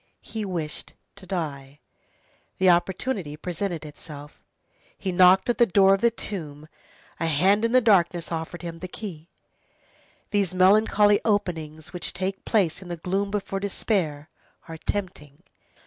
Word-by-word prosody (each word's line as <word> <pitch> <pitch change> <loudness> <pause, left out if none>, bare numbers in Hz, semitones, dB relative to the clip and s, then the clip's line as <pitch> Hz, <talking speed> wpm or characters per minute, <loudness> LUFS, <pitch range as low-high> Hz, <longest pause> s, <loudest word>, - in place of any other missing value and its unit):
He 220 -2 -5
wished 170 -5 -4 0.2
to 190 -2 -11
die; 145 -6 -4 0.8
the 185 -2 +5
opportunity 175 - -1
presented 175 -1 -4
itself; 150 0 -10 0.6
he 190 - -3
knocked 185 +1 +6
at 240 - 0
the 235 - +6
door 195 0 +5
of 195 - 0
the 235 - +5
tomb, 155 -10 -6 0.5
a 165 - 0
hand 190 +8 +3
in 230 - +2
the 255 +1 +5
darkness 180 -6 +2
offered 165 +2 -5
him 165 -1 -6
the 185 - -6
key. 175 -4 -8 1.0
These 200 -3 0
melancholy 205 +2 +5
openings 165 -6 -2
which 180 - -4
take 190 +1 -4
place 195 -7 +1
in 185 - -10
the 175 -1 -5
gloom 195 +4 -1
before 200 -1 -3
despair, 180 -7 -1 0.4
are 165 -1 -7
tempting. 165 -6 -4
180 Hz, 145 wpm, -25 LUFS, 160-200 Hz, 1.0 s, knocked